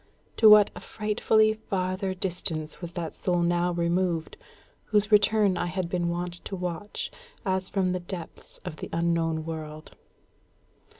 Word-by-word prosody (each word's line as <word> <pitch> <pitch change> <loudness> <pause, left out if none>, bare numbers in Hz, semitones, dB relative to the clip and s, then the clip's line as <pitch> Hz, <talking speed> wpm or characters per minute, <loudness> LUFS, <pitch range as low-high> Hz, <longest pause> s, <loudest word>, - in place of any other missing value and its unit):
To 220 - +8
what 210 -1 +8
a - - -7
frightfully 215 +2 +2
farther 190 -2 -2
distance 170 -4 -3
was 170 -1 -6
that 170 -2 -4
soul 175 -2 0
now 175 +1 +2
removed, 170 -1 0 0.5
whose 210 0 +1
return 210 -2 +4
I 175 - 0
had 180 0 -2
been 175 -1 0
wont 175 0 -4
to 195 - -4
watch, 190 - -4 0.3
as 190 -1 0
from 190 -2 +1
the 185 - -1
depths 175 -1 -9
of 170 -4 -6
the - - -7
unknown 165 -1 0
world! 155 -1 -7
180 Hz, 145 wpm, -27 LUFS, 170-195 Hz, 0.5 s, To